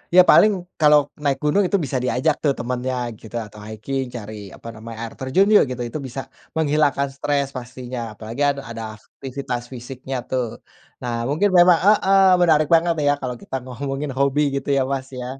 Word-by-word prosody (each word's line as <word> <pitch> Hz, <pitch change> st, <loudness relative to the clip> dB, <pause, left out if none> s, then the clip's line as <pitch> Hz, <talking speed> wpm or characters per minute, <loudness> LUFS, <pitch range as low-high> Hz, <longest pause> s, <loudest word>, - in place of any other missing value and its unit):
ya 185 Hz, -, +10 dB
paling 215 Hz, -, +7 dB, 0.3 s
kalau 150 Hz, 0 st, +7 dB, 0.3 s
naik 140 Hz, -2 st, +1 dB
gunung 150 Hz, +7 st, +3 dB
itu 200 Hz, -, +2 dB
bisa 130 Hz, 0 st, -2 dB
diajak 145 Hz, +4 st, +1 dB
tuh 140 Hz, -2 st, +3 dB
temennya 125 Hz, +1 st, -2 dB, 0.2 s
gitu 110 Hz, +1 st, -11 dB
atau 105 Hz, 0 st, -14 dB
hiking 130 Hz, +5 st, -3 dB
cari, 110 Hz, -1 st, -8 dB, 0.2 s
apa -, -, -12 dB
namanya, 115 Hz, +1 st, -9 dB
air 115 Hz, -, -6 dB
terjun 135 Hz, +10 st, +2 dB
yuk -, -, +7 dB
gitu, 125 Hz, -1 st, -4 dB
itu 155 Hz, -, -5 dB
bisa 135 Hz, +2 st, -5 dB, 0.3 s
menghilangkan 145 Hz, -3 st, +2 dB
stres 140 Hz, 0 st, 0 dB
pastinya, 125 Hz, 0 st, -7 dB
apalagi 110 Hz, +5 st, -7 dB
ad 140 Hz, -, -1 dB
ada 115 Hz, -1 st, -6 dB
aktivitas 125 Hz, +2 st, -6 dB
fisiknya 130 Hz, +2 st, -7 dB
tuh. 130 Hz, -2 st, 0 dB, 0.6 s
Nah 120 Hz, -1 st, -3 dB, 0.2 s
mungkin 180 Hz, +8 st, +2 dB
memang 175 Hz, -1 st, +7 dB
heeh, 195 Hz, -2 st, +5 dB, 0.2 s
menarik 155 Hz, -3 st, +4 dB
banget 170 Hz, +1 st, +3 dB
ya 145 Hz, -, +5 dB
kalau 125 Hz, -2 st, -3 dB
kita -, -, -6 dB
ngomongin 135 Hz, +3 st, -4 dB
hobi 140 Hz, +1 st, +2 dB
gitu 140 Hz, 0 st, -3 dB
ya, 135 Hz, -, +3 dB
Mas, 135 Hz, -1 st, -4 dB
ya. 125 Hz, -, -5 dB
135 Hz, 180 wpm, -21 LUFS, 125-150 Hz, 0.6 s, ya